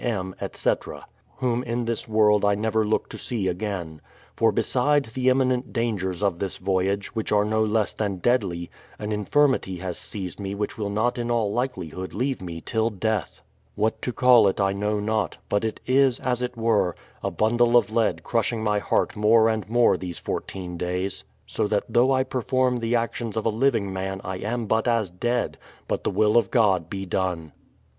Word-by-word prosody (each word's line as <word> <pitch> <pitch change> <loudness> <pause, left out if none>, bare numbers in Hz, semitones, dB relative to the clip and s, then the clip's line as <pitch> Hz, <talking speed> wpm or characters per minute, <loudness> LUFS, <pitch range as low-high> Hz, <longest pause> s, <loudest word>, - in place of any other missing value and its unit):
M., 95 -6 -2
etc., - - -2 0.3
whom 125 -2 0
in 120 -1 -2
this 115 -1 -3
world 105 -1 +4
I 100 0 +3
never 110 +1 +1
look 110 +1 0
to - - -8
see 110 -6 -2
again. 90 -4 -4 0.3
For - - +3
beside 145 +3 +2
the 130 +1 +2
im.minent 130 -1 +1
dangers 105 -6 -2
of 95 -4 +1
this 95 -2 -3
voyage, 95 +1 -1
which 110 -2 -3
are 105 0 +3
no 110 +1 +1
less 110 -1 +1
than 100 -3 -2
deadly, 90 -5 0 0.3
an 105 0 -4
infirmity 105 -2 +1
has 90 -1 -5
seized 95 -3 -6
me 100 0 -4
which 105 0 -3
will 105 -2 -3
not 120 +5 0
in 120 0 -2
all 115 -4 +1
likeli 120 - -2
hood 95 +3 -7
leave 130 +2 -1
me 85 -2 -6
till 110 +4 0
death. 105 -3 -2 0.3
What 110 +2 0
to 125 - -2
call 120 -2 +6
it 95 - 0
I 95 -1 +2
know 105 +1 -1
not; 110 0 -1
but 100 +1 +1
it 110 - -2
is, 130 -1 +3
as 125 -1 -1
it 125 -1 -3
were, 110 -6 +2 0.3
a - - -1
bundle 120 +2 +3
of 120 - +2
lead 115 -1 +1
crushing 115 -1 0
my 105 -1 +2
heart - - 0
more 110 +2 +5
and 110 -2 -2
more 120 +1 +4
these 90 -2 -6
fourteen 90 -2 -5
days, 90 +2 -3 0.2
so - - -1
that 105 -1 +1
though 125 +3 +3
I 130 -1 +3
perform 130 0 0
the 115 0 0
actions 115 -1 -2
of 110 - -1
a - - +3
living 110 -4 +1
man 95 0 -3
I 95 0 -4
am 115 +4 -3
but 110 +2 +1
as 115 -6 +1
dead; 120 +7 -1 0.3
but - - -2
the - - +1
will 105 +3 +3
of 110 -5 +3
God 95 -8 +2
be 95 -1 -4
done. 90 -4 -2
110 Hz, 195 wpm, -25 LUFS, 95-120 Hz, 0.3 s, call